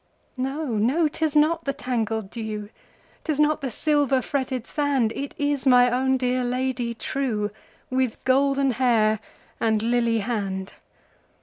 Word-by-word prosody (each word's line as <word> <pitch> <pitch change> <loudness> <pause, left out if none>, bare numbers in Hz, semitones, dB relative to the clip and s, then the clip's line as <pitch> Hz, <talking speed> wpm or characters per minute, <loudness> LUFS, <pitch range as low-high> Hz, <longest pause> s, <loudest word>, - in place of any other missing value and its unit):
No! 270 +4 -2
no! 270 +10 +2
'tis 310 0 -2
not 305 +3 +3
the 275 - 0
tangled 225 -6 -2
dew,'Tis 220 +7 -7
not 300 +1 +3
the 270 - -2
silver 290 0 +2
fretted 260 -3 -2
sand, 275 -7 0
It 280 0 -5
is 285 -2 0
my 250 -1 +6
own 265 +1 +2
dear 255 0 0
Lady 245 -1 -1
trueWith 235 0 -3
golden 275 +1 +3
hair 220 -3 +2 0.4
and 220 -1 +1
lily 235 -1 +2
hand! 195 -4 -3
255 Hz, 125 wpm, -24 LUFS, 225-275 Hz, 0.4 s, my